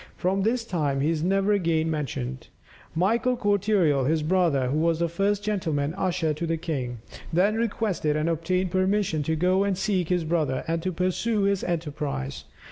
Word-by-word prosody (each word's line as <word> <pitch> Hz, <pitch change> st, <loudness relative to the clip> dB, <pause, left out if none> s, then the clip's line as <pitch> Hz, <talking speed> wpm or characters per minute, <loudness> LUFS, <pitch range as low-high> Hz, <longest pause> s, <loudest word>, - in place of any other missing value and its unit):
But -, -, -29 dB
from 190 Hz, +2 st, +1 dB
this 230 Hz, +3 st, 0 dB
time 150 Hz, -9 st, -1 dB
he 150 Hz, +3 st, +2 dB
is 160 Hz, -2 st, -1 dB
never 195 Hz, +4 st, +2 dB
again 165 Hz, -5 st, +1 dB
mentioned. 130 Hz, -4 st, -4 dB, 0.5 s
Michael 230 Hz, +8 st, +2 dB
Cortereal, 200 Hz, -, +2 dB
his 155 Hz, +2 st, +1 dB
brother, 155 Hz, -7 st, +2 dB
who 150 Hz, +4 st, 0 dB
was 165 Hz, 0 st, +2 dB
the 170 Hz, +1 st, +1 dB
first 195 Hz, +4 st, 0 dB
gentleman 160 Hz, -8 st, -1 dB
usher 175 Hz, -4 st, 0 dB
to 165 Hz, +3 st, -4 dB
the 165 Hz, 0 st, 0 dB
king, 130 Hz, -8 st, -4 dB, 0.3 s
then 185 Hz, +5 st, +3 dB
requested 215 Hz, -8 st, 0 dB
and 155 Hz, +1 st, 0 dB
obtained 175 Hz, +3 st, 0 dB
permission 185 Hz, -3 st, +1 dB
to 160 Hz, +2 st, -1 dB
go 185 Hz, +4 st, +2 dB
and 200 Hz, -2 st, 0 dB
seek 190 Hz, -3 st, 0 dB
his 180 Hz, -2 st, +1 dB
brother, 155 Hz, -5 st, 0 dB
and 165 Hz, 0 st, -1 dB
to 185 Hz, +2 st, -2 dB
pursue 185 Hz, +5 st, 0 dB
his 200 Hz, -1 st, +1 dB
enterprise. 150 Hz, -, -3 dB
170 Hz, 180 wpm, -26 LUFS, 155-195 Hz, 0.5 s, then